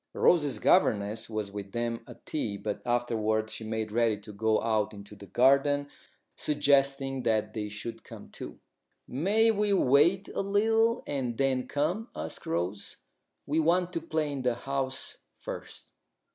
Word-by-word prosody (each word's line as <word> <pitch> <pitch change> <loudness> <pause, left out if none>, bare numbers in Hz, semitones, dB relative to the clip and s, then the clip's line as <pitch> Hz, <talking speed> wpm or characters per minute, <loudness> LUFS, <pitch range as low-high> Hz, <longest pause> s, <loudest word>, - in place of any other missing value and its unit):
Rose's 150 -6 +3
governess 110 - +2
was 110 -2 -3
with 100 -1 -7
them 120 -1 -2
at - - -13
tea, 110 -10 -2
but 105 0 -4
afterwards 110 -2 0
she - - -6
made 110 -1 -3
ready 115 -1 +2
to 105 0 -10
go 110 +1 +2
out 110 -2 0
into 100 +1 -11
the 100 0 -12
garden, 140 +7 +3 0.5
suggesting 140 -2 +2
that 110 -3 0
they 105 -1 -3
should 115 +2 -6
come - - -11
too. - - -9 0.5
"May 205 - +3
we 210 -1 +1
wait 170 +5 +4
a - - -2
little 225 +4 +2
and 125 -5 -2
then 135 -2 +1
come?" 175 +11 -1
asked 80 +1 -5
Rose. 90 +5 -2 0.5
"We 150 +3 +1
want 175 +3 +2
to 165 - -2
play 155 -2 -1
in 140 -2 -3
the 125 -2 +1
house 135 +1 -3 0.2
first." - - -8
125 Hz, 155 wpm, -29 LUFS, 110-150 Hz, 0.5 s, wait